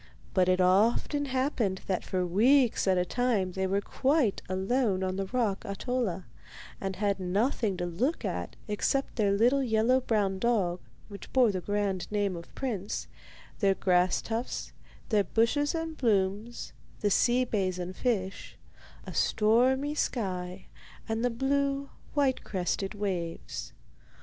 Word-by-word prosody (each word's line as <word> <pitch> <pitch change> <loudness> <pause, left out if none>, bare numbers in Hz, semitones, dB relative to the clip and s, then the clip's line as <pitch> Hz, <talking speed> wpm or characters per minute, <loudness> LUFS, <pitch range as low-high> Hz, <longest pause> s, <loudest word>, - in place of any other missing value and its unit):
But 185 -1 +3
it 185 0 +3
often 220 +10 +3
happened 255 -8 0
that 185 -2 -1
for 185 -1 -1
weeks 235 +7 +3
at 190 -1 +4
a 180 - +2
time 225 -4 0
they 190 +1 -1
were 195 +2 +1
quite 265 0 +1
alone 190 +1 +1
on 185 0 -1
the 195 0 -2
rock 225 -4 0
Ahtola, 200 -3 -2 0.6
and 195 -1 -3
had 200 0 0
nothing 200 +2 0
to 175 - -2
look 235 - -1
at - - -3
except 245 +6 0
their 205 -4 +2
little 240 +7 +3
yellow 245 +1 +3
brown 205 -6 0
dog, 195 -7 +1 0.3
which 200 -2 -10
bore 250 -4 +4
the 185 -2 -3
grand 205 -1 -2
name 205 -3 0
of 170 0 -10
Prince, 215 -7 -3 0.5
their 195 -3 +3
grass 180 -1 +2
tufts, 230 +2 -3 0.4
their 210 -3 +3
bushes 290 - +1
and 325 -1 -3
blooms, 210 0 0 0.3
the 205 - +1
sea 245 +5 +3
bays 190 -6 -1
and 180 +1 -5
fish, 195 -6 -2 0.5
a - - -7
stormy 255 +7 +2
sky 185 -9 -2 0.4
and 225 +1 -1
the 245 - +3
blue, 275 +3 0 0.2
white 275 -3 +2
crested 195 +1 -2
waves. 170 - -4
205 Hz, 145 wpm, -29 LUFS, 190-250 Hz, 0.6 s, at